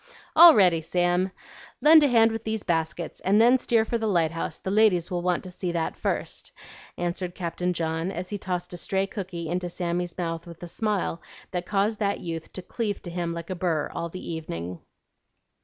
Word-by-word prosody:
"All 335 -1 +10
ready, 180 -6 +4
Sam! 175 +3 +1 0.5
Lend 315 +1 +8
a 290 - +5
hand 230 -3 +5
with 225 0 -4
these 220 -1 -2
baskets, 165 -1 -2
and 200 +3 +3
then 245 +3 +6
steer 230 -2 +2
for 235 +1 -1
the 220 - -1
lighthouse; 165 -4 0
the 190 - -4
ladies 200 -4 +3
want 175 0 0
to 185 - -8
see 180 0 -3
that 165 -1 -1
first," - - -3 0.5
answered 175 +1 -3
Captain 180 0 -2
John, 165 0 -2
as 180 0 -5
he 205 - -4
tossed 180 -1 -3
a - - -5
stray 190 +3 0
cookie 185 -4 -6
into 175 +2 -2
Sammy's 175 0 -3
mouth 165 -1 -3
with 170 0 -11
a - - -5
smile 200 -2 -2 0.3
that 180 -1 -3
caused 205 +2 0
that 200 -2 0
youth 165 -1 -6
to 185 - -7
cleave 210 0 -3
to 175 - -7
him 170 -1 -2
like 170 +1 -6
a - - -2
burr 170 -4 -1
all 170 - -3
the 185 +2 -8
evening. 90 - -5
180 Hz, 195 wpm, -26 LUFS, 170-205 Hz, 0.5 s, All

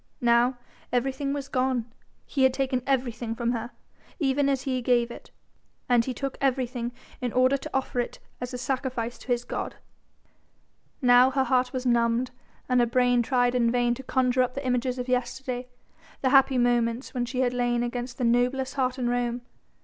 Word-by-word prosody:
Now 240 +1 +3 0.3
everything 270 +3 0
was 280 -1 -3
gone, 255 -3 0 0.4
he 275 - -2
had 260 -1 +4
taken 265 -2 0
everything 240 -4 -1
from 235 0 0
her, 235 0 -3 0.5
even 280 -2 +1
as 270 -1 0
he 260 -2 -1
gave 240 -1 +2
it; - - -11 0.6
and 245 -2 +4
he 260 - -2
took 275 +1 -4
everything 250 -3 0 0.3
in 250 -2 -1
order 255 +3 +4
to 310 - -8
offer 265 -2 -1
it 240 - -2 0.2
as 250 0 -4
a 250 - -4
sacrifice 250 -2 -3
to - - -14
his 245 -1 0
God. - - -4 1.3
Now 245 +1 +7
her 265 0 +1
heart 255 0 +1
was 255 0 -4
numbed 235 +1 +2 0.4
and 250 0 +3
her 240 - +4
brain 245 0 +3
tried 245 0 +2
in 240 -2 +3
vain 240 0 +2
to 250 - -7
conjure 255 -1 +1
up 250 0 0
the 275 0 -4
images 250 0 0
of 250 0 -4
yesterday: 250 0 -2 0.5
the 260 - +2
happy 270 -1 +5
moments 240 0 +1
when 245 -2 -1
she 255 +1 -1
had 250 -1 +1
lain 240 -1 +1
against 245 +1 -4
the 255 - -2
noblest 250 +3 +1
heart 255 -1 0
in 250 -2 -1
Rome. 245 0 -1
250 Hz, 185 wpm, -26 LUFS, 240-260 Hz, 1.3 s, Now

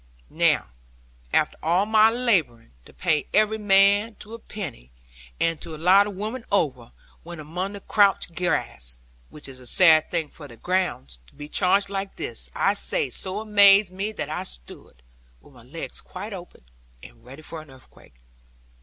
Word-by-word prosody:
Now - - +2 0.6
after - - +1
all 175 +5 +2
my 220 0 +5
labouring 190 - 0
to - - -15
pay 155 -5 0
every 215 +1 +3
man 205 +2 +3
to 215 - -12
a 230 - -8
penny, 160 - -8 0.5
and 165 -2 0
to 165 -2 -8
allow 185 +6 +5
the - - -4
women 215 +5 -5
over, 130 -11 0 0.3
when 170 -1 -10
among 180 +6 -5
the 200 - -9
couch 200 -5 +2
grass 60 - -1 0.3
(which 150 - -11
is 130 -1 -11
a 125 - -10
sad 160 +1 +5
thing 165 -4 -2
for 150 -3 -11
their 120 -3 -14
gowns), 175 - -2
to - - -23
be 145 0 -9
charged 195 +5 +2
like 195 0 -4
this, 430 +3 -7
I - - +2
say, 475 -4 -2
so 190 +2 -4
amazed 200 -2 +5
me 200 +3 -3
that - - -5
I - - -3
stood, - - -9 0.4
with 145 - -21
my 125 - -16
legs 140 +8 -5
quite 200 +3 -8
open, 180 - -11 0.4
and - - -15
ready 135 +5 -12
for 160 0 -5
an 155 - -17
earthquake. 130 - -17
180 Hz, 170 wpm, -24 LUFS, 145-205 Hz, 0.6 s, my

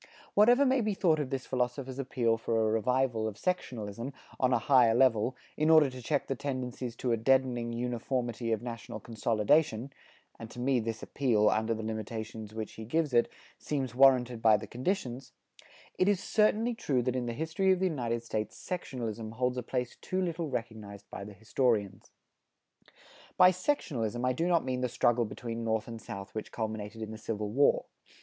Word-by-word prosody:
Whatever 245 +7 +6
may 260 -1 +3
be 210 -2 0
thought 165 -5 +3
of 145 -3 -2
this 135 -1 -3
philosopher's 130 +1 -2
appeal 125 -4 +1
for 115 0 -1
a 110 -1 +2
revival 115 0 +1
of 105 -2 -6
sectionalism, 120 - -3 0.3
on 130 0 +3
a 125 - +4
higher 120 -1 +4
level, 125 -1 +3 0.2
in 155 +1 +1
order 155 -4 +6
to 130 0 -9
check 140 +4 0
the - - -2
tendencies 125 -2 -4
to 125 0 -2
a 115 - +2
deadening 125 0 +2
uniformity 120 0 -2
of 110 0 -1
national 115 -3 -6
consolidation 115 +4 +1 0.5
(and 115 - -8
to 120 - -10
me 130 0 +2
this 115 0 -4
appeal, 110 -6 +2
under 110 +1 +1
the 110 - -5
limitations 110 0 -5
which 110 -1 -5
he 110 - -8
gives 150 +5 0
it, 120 0 +3 0.3
seems 135 -5 -2
warranted 125 -3 +4
by 110 -2 +6
the 105 - -7
conditions) 130 -3 -3 0.7
it 185 - +4
is 200 -3 +2
certainly 220 +3 +2
true 135 - 0
that 125 +1 -1
in 125 -1 -2
the - - -1
history 160 - +1
of 185 - +4
the 190 - 0
United 120 -9 -1
States 110 -2 -3
sectionalism 115 - -5
holds 125 +1 0
a - - -2
place 125 0 -3
too 185 - -3
little 170 -3 -2
recognized 110 -5 -6
by - - -6
the 105 +1 -9
historians. 105 -1 -1 1.3
By 180 0 +8
sectionalism 130 - -1
I 130 - +2
do 165 +7 -1
not 170 -4 +2
mean 130 -1 -2
the 125 - 0
struggle 120 0 +2
between 115 +1 -5
North 110 -1 -1
and 115 -1 -7
South 100 +1 -8
which 110 - -5
culminated 110 0 -4
in 110 - -6
the 110 - -8
Civil 105 -2 -3
War. 140 +5 +3
120 Hz, 185 wpm, -30 LUFS, 110-135 Hz, 1.3 s, By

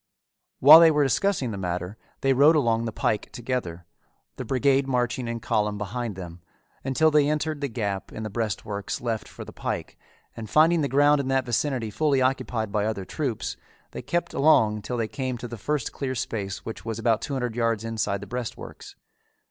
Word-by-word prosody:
While 150 +5 +10
they 165 -1 +8
were 150 -2 +3
discussing 140 - +1
the 100 - -5
matter 90 +1 -3 0.3
they 135 0 +3
rode 145 +5 +6
along 115 -5 +2
the 115 - -3
pike 105 0 -1
together, 115 -9 -4 0.5
the - - -4
brigade 135 +1 +2
marching 125 -1 -1
in 115 0 -3
column 105 -2 0
behind 105 +1 -4
them, 90 -2 -9 0.4
until 155 +4 +2
they 150 -1 +4
entered 150 0 -2
the 140 - 0
gap 105 -6 -4
in 110 - -6
the 110 - -4
breastworks 105 -2 -3
left 115 -3 -3
for - - -10
the - - -11
pike - - -5 0.4
and 110 -2 -7
finding 160 +2 +4
the 145 - +1
ground 145 +1 +4
in 135 - -5
that 135 -1 +1
vicinity 120 -2 -1
fully 145 +3 +1
occupied 125 -4 -1
by 105 -1 0
other 100 -4 -3
troops, 130 0 -3 0.3
they - - -6
kept 175 0 -2
along 110 -8 +4
till 120 +4 -4
they 115 -2 -1
came 130 0 -4
to 120 - -7
the 120 - -7
first 140 +4 -2
clear 130 -2 -3
space 100 -4 -4
which 110 - -7
was 115 -1 -4
about 115 -1 +1
two 140 - -4
hundred 125 -4 -2
yards 115 -2 0
inside 110 -3 -2
the - - -7
breastworks. 125 +1 -7
120 Hz, 195 wpm, -25 LUFS, 110-140 Hz, 0.5 s, While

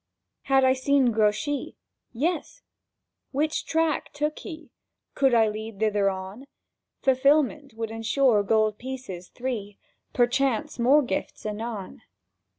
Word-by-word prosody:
Had 270 -1 +4
I 260 0 +5
seen 260 -1 +2
Grouchy? 220 +6 0 0.3
Yes? 315 +8 -2 0.7
Which 305 +3 -1
track 325 -1 0
took 300 +1 -2
he? 320 -4 -9 0.4
Could 270 -3 +3
I 225 -1 +5
lead 215 -1 -6
thither 210 -2 +2
on?— 190 +7 -7 0.6
Fulfilment 280 0 +2
would 225 -1 -4
ensure 225 0 +2
gold 215 0 +1
pieces 250 -9 -7
three, 225 -6 -5 0.3
Perchance 265 +3 +1
more 275 +5 +5
gifts 205 -3 -4
anon. 215 -1 -5
245 Hz, 115 wpm, -26 LUFS, 215-280 Hz, 0.7 s, I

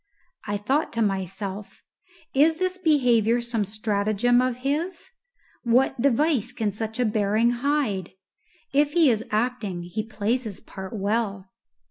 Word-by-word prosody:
I 205 0 -1
thought 265 +10 0
to 230 - -1
myself, 195 0 -4 0.5
"Is 305 +4 +4
this 370 +2 -1
behaviour 245 - +3
some 235 -2 -1
stratagem 215 +3 +1
of 255 -1 0
his? 320 +7 -1 0.5
What 245 0 +2
device 280 -1 +2
can 215 -2 -1
such 220 +3 -5
a 250 - +3
bearing 215 +2 +2
hide? 245 - -1 0.6
If 290 +1 +3
he 325 -6 +5
is 225 -1 -1
acting, 215 -5 -1
he 175 +5 -3
plays 220 +3 -2
his 205 -4 -5
part 190 +1 -9
well." 200 -2 -2
225 Hz, 135 wpm, -25 LUFS, 205-260 Hz, 0.6 s, he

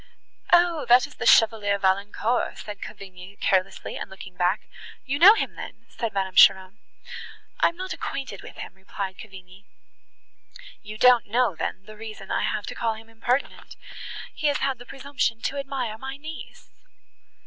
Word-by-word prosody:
"O! 345 -3 +4
that 245 +1 +7
is - - -13
the - - -3
Chevalier 210 -2 +5
Valancourt," 200 +5 0
said 205 -1 -8
Cavigni 195 -2 -10
carelessly, 185 -1 0
and - - -6
looking 185 -1 -11
back. 180 +4 +1 0.4
"You 280 +2 -2
know 395 +6 +10
him - - -2
then?" - - -10
said 230 -2 -4
Madame 190 -1 -2
Cheron. 190 +3 +5 0.8
"I - - +5
am 335 - -4
not 370 0 -4
acquainted 265 -8 -5
with - - -12
him," - - -8
replied 190 0 -6
Cavigni. 190 -1 -13 1.2
"You 215 +1 -9
don't 245 -1 +5
know, 235 -1 +2
then, 190 - -4
the 215 - -12
reason 215 -3 -9
I - - +1
have 210 -1 -1
to - - -6
call 225 -1 -1
him 225 +1 -14
impertinent;—he 250 +5 -4
has 290 0 +2
had 270 -3 -1
the 245 - -12
presumption 270 -4 -2
to 280 - -2
admire 255 -5 -4
my 270 +2 -6
niece!" 310 +2 -10
220 Hz, 160 wpm, -25 LUFS, 195-265 Hz, 1.2 s, know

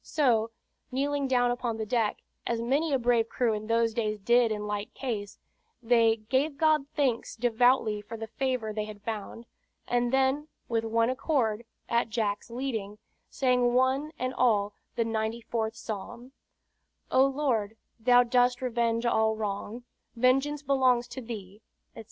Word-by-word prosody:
So, 235 -7 +2 0.4
kneeling 280 +1 0
down 245 -2 +2
upon 245 -2 -2
the 220 - -3
deck, 225 -1 0 0.2
as 235 -1 0
many 280 +7 0
a 270 - +3
brave 235 -2 +2
crew 240 -3 +1
in 215 0 -4
those 230 0 +2
days 215 -2 -1
did 235 +3 +3
in 210 -1 -3
like 205 0 -4
case, 215 -7 -4 0.5
they 230 -1 +4
"gave 275 +4 +1
God 310 -2 +3
thanks 260 -6 0
devoutly 235 -2 +2
for 225 +2 -8
the 225 - -5
favor 245 -2 -2
they 210 0 -2
had 210 -1 -10
found"; 220 +1 -5 0.4
and 240 0 +1
then 270 +3 +2 0.2
with 225 -1 0
one 230 +2 +1
accord, 240 -5 0 0.2
at 235 -1 +1
Jack's 215 -1 -2
leading, 230 -5 -4 0.3
sang 250 -2 +2
one 265 +4 +2
and 255 +1 -2
all 210 -6 +2 0.2
the 230 - +1
ninety 225 +1 -2
fourth 225 -1 -2
Psalm: 235 +3 -7 0.8
"O, 260 - +5
Lord, 260 -6 0 0.2
Thou 245 +2 +5
dost 245 0 +2
revenge 235 -1 0
all 220 -2 +2
wrong, 215 +2 -4 0.3
Vengeance 270 +4 +2
belongs 255 -3 +2
to 260 - -7
Thee," 210 -3 -8 0.3
etc. - - -10
235 Hz, 155 wpm, -28 LUFS, 220-255 Hz, 0.8 s, O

